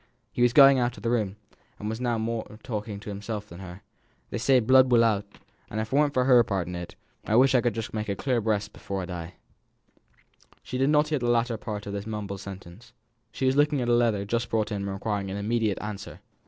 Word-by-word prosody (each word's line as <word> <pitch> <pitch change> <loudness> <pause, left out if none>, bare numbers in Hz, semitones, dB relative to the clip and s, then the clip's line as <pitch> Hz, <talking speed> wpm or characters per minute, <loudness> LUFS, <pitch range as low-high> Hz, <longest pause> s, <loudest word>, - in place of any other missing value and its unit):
He - - -3
was 120 -1 +5
going 135 0 +7
out 120 0 -1
of - - -12
the 115 - 0
room, 105 -5 0 0.4
and 105 - -6
was 110 +2 -4
now 120 -2 0
more 110 -1 -4
talking 105 -4 -4
to 105 0 -7
himself 105 +1 -5
than 85 -1 -11
to 95 - -8
her. 90 +1 -10 0.5
"They - - -3
say 130 +2 +4
blood 130 +2 +5
will 115 -1 +6
out, 105 -3 +1 0.4
and 110 - -4
if 110 +4 -4
it - - +2
weren't 145 0 +3
for 125 -1 +3
her 125 -3 +6
part 95 -5 -2
in 90 - -5
it, 85 0 -7 0.3
I - - -2
could - - +6
wish 130 +2 +6
for 115 -3 0
a 105 -2 -2
clear 125 +1 0
breast 105 -1 -1
before 95 -1 -5
I - - -4
die." 90 -1 -7 1.3
She 125 - -5
did 135 +2 +3
not 150 0 +3
hear 150 -2 0
the 120 -1 -1
latter 120 0 +2
part 105 -1 -6
of 100 - -5
this 100 +1 -5
mumbled 100 -3 -5
sentence. 100 +4 -11 0.4
She 130 - -3
was 130 +1 +3
looking 145 0 +3
at 120 -1 -1
a - - +4
letter 115 -4 +2
just 115 +3 -1
brought 110 -1 0
in 105 - -1
and 100 - -3
requiring 100 0 -3
an 95 - -4
immediate 110 0 0
answer. 105 -1 -7
110 Hz, 240 wpm, -26 LUFS, 100-120 Hz, 1.3 s, going